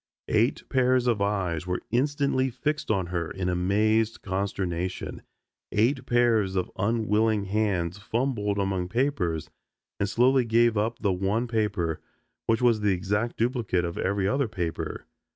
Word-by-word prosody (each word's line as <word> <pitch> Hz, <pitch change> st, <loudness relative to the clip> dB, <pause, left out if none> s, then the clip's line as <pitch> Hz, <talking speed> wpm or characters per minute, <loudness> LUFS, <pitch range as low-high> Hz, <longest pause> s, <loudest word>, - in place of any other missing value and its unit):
Eight 115 Hz, +4 st, +1 dB
pairs 130 Hz, -1 st, +2 dB
of 115 Hz, -4 st, +1 dB
eyes 90 Hz, -5 st, -1 dB
were 90 Hz, 0 st, -2 dB
instantly 140 Hz, +1 st, +1 dB
fixed 150 Hz, +5 st, -2 dB
on 95 Hz, -4 st, +1 dB
her 85 Hz, -2 st, -1 dB
in 95 Hz, -1 st, -3 dB
amazed 105 Hz, +5 st, +1 dB
consternation. 95 Hz, -2 st, -3 dB, 0.5 s
Eight 125 Hz, +5 st, +1 dB
pairs 115 Hz, -5 st, +2 dB
of 90 Hz, -, -1 dB
unwilling 110 Hz, 0 st, +1 dB
hands 95 Hz, -3 st, -1 dB
fumbled 110 Hz, -2 st, -1 dB
among 95 Hz, -2 st, -1 dB
papers 90 Hz, -, -1 dB, 0.5 s
and 100 Hz, -, 0 dB
slowly 125 Hz, +4 st, +4 dB
gave 115 Hz, 0 st, +3 dB
up 110 Hz, +3 st, 0 dB
the 100 Hz, -3 st, 0 dB
one 100 Hz, +6 st, 0 dB
paper, 105 Hz, -8 st, -1 dB, 0.5 s
which 115 Hz, +2 st, +2 dB
was 120 Hz, -3 st, +4 dB
the 105 Hz, -1 st, +3 dB
exact 105 Hz, +6 st, -1 dB
duplicate 115 Hz, -7 st, 0 dB
of 85 Hz, -, -4 dB
every 100 Hz, 0 st, 0 dB
other 135 Hz, +3 st, +1 dB
paper. 85 Hz, -6 st, -4 dB
105 Hz, 140 wpm, -26 LUFS, 95-120 Hz, 0.5 s, slowly